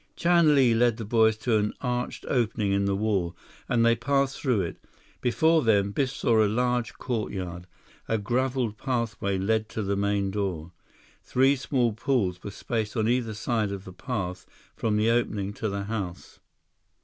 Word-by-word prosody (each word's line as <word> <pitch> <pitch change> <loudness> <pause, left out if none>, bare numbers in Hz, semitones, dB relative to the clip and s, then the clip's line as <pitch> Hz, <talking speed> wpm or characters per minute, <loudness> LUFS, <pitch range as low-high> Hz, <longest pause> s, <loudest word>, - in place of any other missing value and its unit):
Chan 170 -3 +4
Li 130 -4 +5
led 120 0 +3
the 115 - -5
boys 110 0 +3
to 110 0 +1
an 105 0 -1
arched 125 -1 -3
opening 115 -5 0
in 100 0 +1
the 100 0 +1
wall, 95 -5 -1 0.3
and 115 -2 +3
they 115 0 +5
passed 135 +3 0
through 125 -8 +2
it. 85 - -5 0.4
Before 160 +6 +3
them, 100 -5 +2
Biff 135 +4 0
saw 115 -4 +2
a - - +3
large 125 +1 0
courtyard. 90 -7 -4 0.4
A 110 - +1
graveled 120 0 -1
pathway 115 -6 -1
led 110 +3 0
to 110 - -3
the 100 0 0
main 100 -1 0
door. 90 -5 -3 0.5
Three 135 +2 +3
small 125 -3 0
pools 105 -7 0
were - - -6
spaced 110 +2 -3
on 110 -1 +1
either 120 -2 0
side 110 -2 -1
of 100 -1 -6
the 95 - -9
path 95 -6 -4 0.3
from 110 -2 0
the 110 +2 +3
opening 105 -4 0
to 110 +1 -3
the 100 0 -3
house. 100 -5 -5
110 Hz, 175 wpm, -26 LUFS, 100-125 Hz, 0.5 s, Li